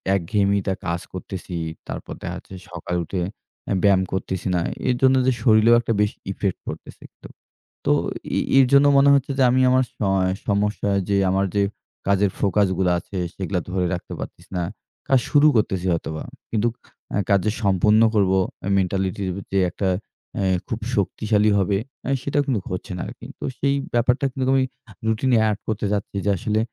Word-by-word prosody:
একঘেয়ামিটা 100 Hz, +1 st, +1 dB
কাজ 85 Hz, +1 st, -1 dB
করতেছি, 95 Hz, -1 st, -6 dB, 0.3 s
তারপর -, -, -6 dB
দেখা -, -, -4 dB
যাচ্ছে -, -, -13 dB, 0.2 s
সকালে 90 Hz, 0 st, -4 dB
উঠে 90 Hz, +2 st, -3 dB, 0.5 s
অ্যা -, -, 0 dB
ব্যায়াম 100 Hz, -2 st, +5 dB
করতেছি 95 Hz, -1 st, -3 dB
না। -, -, +2 dB, 0.3 s
এরজন্য 130 Hz, +1 st, +4 dB
যে -, -, +5 dB
শরীরেও 110 Hz, 0 st, +6 dB
একটা 115 Hz, -, -1 dB
বেশি 105 Hz, 0 st, 0 dB
ইফেক্ট 100 Hz, -1 st, -2 dB
পড়তেছেই -, -, -8 dB
তো। -, -, -8 dB, 0.6 s
তো -, -, +3 dB, 0.5 s
এ -, -, +3 dB, 0.2 s
এর 135 Hz, -, +7 dB
জন্য 140 Hz, +1 st, +7 dB
মনে 140 Hz, +1 st, +6 dB
হচ্ছে 140 Hz, 0 st, +2 dB
যে 135 Hz, -, +4 dB
আমি 130 Hz, +1 st, +3 dB
আমার 130 Hz, +1 st, +4 dB
সয় 95 Hz, -2 st, +1 dB, 0.2 s
সমস্যা 105 Hz, 0 st, 0 dB, 0.2 s
যে 100 Hz, -, +2 dB, 0.2 s
আমার 95 Hz, +1 st, +2 dB
যে 100 Hz, -, +3 dB, 0.5 s
কাজের 100 Hz, 0 st, +3 dB
ফোকাসগুলা 95 Hz, -2 st, +2 dB
আছে 95 Hz, -, -8 dB, 0.2 s
সেগুলা 95 Hz, -1 st, -2 dB
ধরে 90 Hz, 0 st, 0 dB
রাখতে 90 Hz, -, -5 dB
পারতেসি -, -, -9 dB
না। 90 Hz, -, 0 dB, 0.5 s
কাজ 135 Hz, -, +5 dB
শুরু 150 Hz, 0 st, +6 dB
করতেছি 95 Hz, -4 st, +1 dB
হয়তোবা। 80 Hz, -2 st, -3 dB, 0.3 s
কিন্তু 110 Hz, +1 st, +1 dB, 0.4 s
অ্যা -, -, 0 dB
কাজ 100 Hz, -1 st, +5 dB
যে 105 Hz, -, +2 dB
সম্পন্ন 105 Hz, +3 st, +4 dB
করবো 95 Hz, -2 st, +3 dB, 0.3 s
এ -, -, 0 dB
মেন্টালিটির 95 Hz, 0 st, -1 dB
ভিত্তি 100 Hz, 0 st, -4 dB
একটা 100 Hz, -, -2 dB, 0.5 s
অ্যা 100 Hz, -, 0 dB, 0.2 s
খুব -, -, -3 dB, 0.2 s
শক্তিশালী 105 Hz, -1 st, +1 dB
হবে 95 Hz, 0 st, +2 dB, 0.3 s
অ্যা 135 Hz, -, -2 dB
সেটাও 145 Hz, +2 st, +1 dB
কিন্তু 130 Hz, -6 st, 0 dB
হচ্ছে 90 Hz, -, -5 dB
না -, -, -4 dB
আরকি। -, -, -10 dB
তো -, -, -8 dB
সেই 140 Hz, 0 st, +1 dB, 0.2 s
ব্যাপারটা 125 Hz, +3 st, +2 dB
কিন্তু 130 Hz, 0 st, -2 dB
আমি 135 Hz, -1 st, +4 dB, 0.4 s
রুটিনে 120 Hz, +3 st, +2 dB
এড 105 Hz, -2 st, 0 dB
করতে 110 Hz, -1 st, -1 dB
চাচ্ছি 100 Hz, -1 st, -2 dB
যে -, -, +2 dB
আসলে 105 Hz, +4 st, 0 dB
100 Hz, 175 wpm, -22 LUFS, 95-115 Hz, 0.6 s, এর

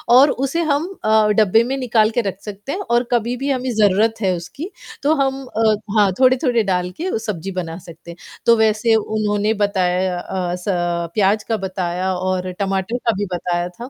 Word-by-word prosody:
और 275 Hz, +3 st, +7 dB
उसे 275 Hz, +6 st, -1 dB
हम 290 Hz, +4 st, +1 dB, 0.2 s
अ, 215 Hz, 0 st, +4 dB
डब्बे 220 Hz, +1 st, +4 dB
में 260 Hz, +3 st, -2 dB
निकाल 225 Hz, -4 st, +2 dB
के 240 Hz, +1 st, +1 dB
रख 195 Hz, -2 st, -4 dB
सकते 210 Hz, +5 st, -7 dB
हैं 375 Hz, -, -3 dB
और 240 Hz, +1 st, +3 dB
कभी 240 Hz, 0 st, +1 dB
भी 275 Hz, +3 st, -3 dB
हमें 255 Hz, -1 st, -1 dB
ज़रूरत 215 Hz, +2 st, +2 dB
है 190 Hz, -2 st, +2 dB
उसकी, 180 Hz, -, -7 dB, 0.3 s
तो 300 Hz, +2 st, +3 dB
हम 270 Hz, -1 st, -1 dB
अ, 220 Hz, -2 st, +1 dB, 0.2 s
हाँ, 205 Hz, -2 st, +4 dB
थोड़े-थोड़े 255 Hz, -3 st, +3 dB
डाल 180 Hz, -2 st, 0 dB
के 365 Hz, -9 st, -1 dB
सब्ज़ी 195 Hz, -3 st, -4 dB
बना 170 Hz, -3 st, -4 dB
सकते 170 Hz, +1 st, -11 dB
हैं, 170 Hz, -, -12 dB, 0.3 s
तो 235 Hz, -, +6 dB
वैसे 220 Hz, +1 st, +3 dB
उन्होंने 215 Hz, 0 st, 0 dB
बताया 185 Hz, -2 st, 0 dB
अ, 180 Hz, -1 st, -3 dB
स 180 Hz, -, -10 dB, 0.5 s
प्याज़ 210 Hz, +1 st, +2 dB
का 225 Hz, -, +1 dB
बताया 185 Hz, 0 st, -2 dB
और 185 Hz, 0 st, -2 dB
टमाटर 195 Hz, +3 st, -1 dB
का -, -, +6 dB
भी 205 Hz, -, -1 dB
बताया 175 Hz, 0 st, -2 dB
था। 235 Hz, +8 st, -10 dB
215 Hz, 190 wpm, -19 LUFS, 185-240 Hz, 0.5 s, और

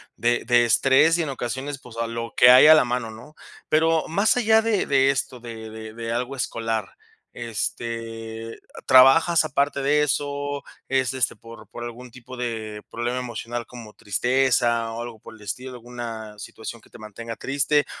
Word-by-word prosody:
de 120 Hz, 0 st, 0 dB
de 120 Hz, 0 st, +4 dB
estrés, 135 Hz, +8 st, +4 dB
y 170 Hz, -, 0 dB
en 145 Hz, -, -4 dB
ocasiones, 135 Hz, +2 st, -4 dB
pues 120 Hz, -3 st, -14 dB
a 115 Hz, 0 st, -1 dB
lo 115 Hz, 0 st, -5 dB
que 125 Hz, -, +8 dB
hay 130 Hz, +4 st, +8 dB
a 155 Hz, -, +10 dB
la 155 Hz, -, +5 dB
mano, 120 Hz, -2 st, -3 dB
¿no? 125 Hz, +8 st, -13 dB, 0.3 s
Pero 160 Hz, +1 st, +2 dB
más 200 Hz, +8 st, +2 dB
allá 220 Hz, -1 st, +4 dB
de 220 Hz, -3 st, 0 dB
de 135 Hz, -1 st, +3 dB
esto, 130 Hz, -2 st, -2 dB
de 115 Hz, -2 st, -8 dB
de 110 Hz, 0 st, -9 dB
de 115 Hz, 0 st, -5 dB
algo 125 Hz, +3 st, -3 dB
escolar, 115 Hz, -2 st, -3 dB, 0.4 s
este, 115 Hz, 0 st, -5 dB, 0.2 s
¿trabajas 155 Hz, +6 st, +6 dB
aparte 140 Hz, -1 st, 0 dB
de 150 Hz, +2 st, +3 dB
eso? 145 Hz, 0 st, -2 dB, 0.2 s
Es, 130 Hz, -1 st, 0 dB
este, 130 Hz, -3 st, -1 dB
¿por 115 Hz, -1 st, -13 dB
por 120 Hz, +2 st, -9 dB
algún 120 Hz, +1 st, -8 dB
tipo 125 Hz, +1 st, -12 dB
de 110 Hz, -3 st, -4 dB
problema 120 Hz, +2 st, -3 dB
emocional? 120 Hz, -1 st, -5 dB
como 115 Hz, -4 st, -12 dB
tristeza 120 Hz, +1 st, +1 dB
o 115 Hz, -, -5 dB
algo 120 Hz, -2 st, -8 dB
por 110 Hz, +1 st, -13 dB
el 110 Hz, -, -18 dB
estilo. 125 Hz, +4 st, -7 dB
Una 115 Hz, -3 st, -8 dB
situación 110 Hz, +2 st, -8 dB
que -, -, -22 dB
te -, -, -14 dB
mantenga 115 Hz, +1 st, -8 dB
triste. 145 Hz, +2 st, +1 dB
120 Hz, 175 wpm, -23 LUFS, 115-135 Hz, 0.4 s, a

